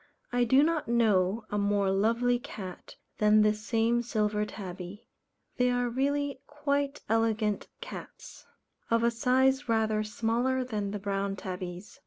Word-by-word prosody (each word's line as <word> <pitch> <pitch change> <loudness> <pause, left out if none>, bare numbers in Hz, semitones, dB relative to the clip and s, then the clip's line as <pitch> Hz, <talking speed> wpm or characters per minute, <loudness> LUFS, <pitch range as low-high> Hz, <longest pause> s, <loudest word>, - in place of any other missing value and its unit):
I 245 0 +2
do 260 +5 +5
not 325 0 0
know 215 -3 +2
a 205 - 0
more 200 -1 +2
lovely 230 +5 +2
cat 195 -9 -9 0.2
than 210 0 +5
this 210 0 +1
same 230 +1 +2
Silver 210 -3 0
Tabby. 190 0 -8 0.5
They 250 0 +3
are 245 0 +1
really 280 +2 -1
quite 285 -1 -1
elegant 220 -1 +1
cats. - - -10 0.4
Of 230 0 +2
a 235 - +3
size 260 +3 +2
rather 220 -1 +2
smaller 235 +4 0
than 210 -5 -3
the 210 - -3
Brown 200 0 -2
Tabbies. 185 +4 -7
225 Hz, 140 wpm, -29 LUFS, 205-250 Hz, 0.5 s, do